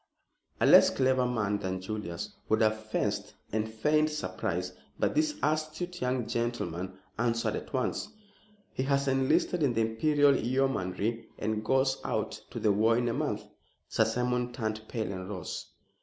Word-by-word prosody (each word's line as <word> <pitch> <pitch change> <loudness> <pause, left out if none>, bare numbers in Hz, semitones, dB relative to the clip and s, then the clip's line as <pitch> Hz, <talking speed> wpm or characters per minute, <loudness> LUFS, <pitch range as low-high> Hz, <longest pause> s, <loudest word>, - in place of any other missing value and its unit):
A - - +3
less - - +8
clever 130 -1 +2
man 105 -4 0
than 95 -1 -2
Julius 95 -3 -5 0.2
would 110 +1 +3
have 110 0 +2
fenced 110 - -1 0.2
and 110 +1 -1
feigned 150 +7 +2
surprise, 150 0 -3 0.3
but - - +1
this 310 0 +2
astute 155 +4 -1
young 125 -1 0
gentleman 95 -7 -2 0.2
answered 115 -2 +1
at - - -6
once. 130 -2 -1 0.7
"He - - -2
has 140 +1 +1
enlisted 135 +6 +2
in 135 -5 +2
the 115 - +2
Imperial 140 +6 +3
Yeomanry 115 -4 0
and 110 0 -1
goes 130 +3 +2
out - - -1 0.2
to - - -5
the 105 - +3
war 110 +3 +3
in 120 0 +1
a - - 0
month." - - -1 0.5
Sir - - +3
Simon 125 0 0
turned 110 -3 -3
pale 110 -5 -3
and 95 0 -6
rose. 95 -4 -5
120 Hz, 155 wpm, -30 LUFS, 110-135 Hz, 0.7 s, less